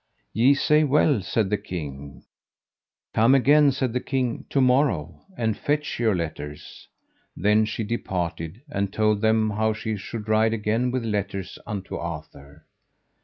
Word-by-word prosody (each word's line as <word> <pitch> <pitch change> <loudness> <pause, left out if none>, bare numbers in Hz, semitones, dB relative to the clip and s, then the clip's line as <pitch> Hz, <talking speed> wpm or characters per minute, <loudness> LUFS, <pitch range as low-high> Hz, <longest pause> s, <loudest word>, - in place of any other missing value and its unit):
Ye 125 +6 +4
say 150 +2 +3
well, 145 -4 +3
said 95 +2 -1
the 105 - +1
king; 70 -8 -7 0.9
come 115 +5 +5
again, 145 +2 +5
said 130 -3 -2
the 125 - +1
king, 125 -3 -2
to 140 - +1
morn, 125 - +2 0.2
and 110 -2 0
fetch 150 +4 -2
your 110 -4 +2
letters. 75 -3 -6 0.5
Then 105 +3 +3
she 110 +1 -3
departed 90 - -4
and 100 -9 -2
told 105 -1 +1
them 110 -1 +2
how 110 +1 +1
she 110 0 -4
should 105 +2 -7
ride 110 +1 +3
again 110 +3 0
with 125 -2 -2
letters 100 -3 -3
unto 100 -2 -5
Arthur. 75 -3 -8
110 Hz, 145 wpm, -24 LUFS, 95-125 Hz, 0.9 s, come